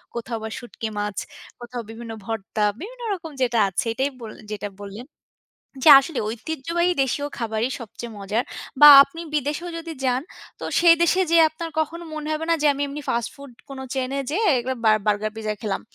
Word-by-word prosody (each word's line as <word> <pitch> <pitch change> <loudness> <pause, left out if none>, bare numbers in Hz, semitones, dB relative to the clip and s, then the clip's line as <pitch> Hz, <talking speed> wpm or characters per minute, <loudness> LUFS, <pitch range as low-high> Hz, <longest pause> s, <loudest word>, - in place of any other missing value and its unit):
কোথাও 235 0 -4
বা 220 - -4
শুটকি 240 -2 -7
মাছ, 205 -1 -3 0.4
কোথাও 240 0 -6
বিভিন্ন 225 0 -8
ভর্তা, 220 -1 -3 0.2
বিভিন্ন 485 +7 -9
রকম 330 -4 -7
যেটা 240 -2 +2
আছে, 190 - -2
এটাই 265 +4 0
বললেন, 220 -1 -10
যেটা 205 0 -5
বললেন। 205 +4 -8 0.8
যে - - +7
আসলে 275 +1 -5
ঐতিহ্যবাহী 320 +9 -1
দেশীয় 275 +2 -1
খাবারই 230 0 -1
সবচেয়ে 235 +1 -8
মজার 210 +5 -1 0.4
বা 295 - +11 0.2
আপনি 300 +4 -8
বিদেশেও 300 +4 -2
যদি 330 0 -7
যান, 255 0 +1 0.4
তো - - -7 0.2
সেই 340 -1 +8
দেশে 350 +2 +3
যেয়ে 335 -1 +6
আপনার 330 +1 -6
কখনো 335 +2 -2
মনে 305 0 -5
হবে 310 +1 -2
না 335 - +5
যে 300 - +4
আমি 280 +1 -3
এমনি 285 +1 -6
ফাস্ট 235 -2 -1
ফুড 280 -1 -12 0.2
কোন 275 -1 -8 0.2
চেইনে 265 +1 -2
যেয়ে 415 +8 0
এর 250 - +1 0.2
বা 220 - +6 0.2
বার্গার 210 +1 +1
পিজ্জা 215 -1 -3
খেলাম। 205 -3 -2
260 Hz, 185 wpm, -23 LUFS, 225-315 Hz, 0.8 s, বা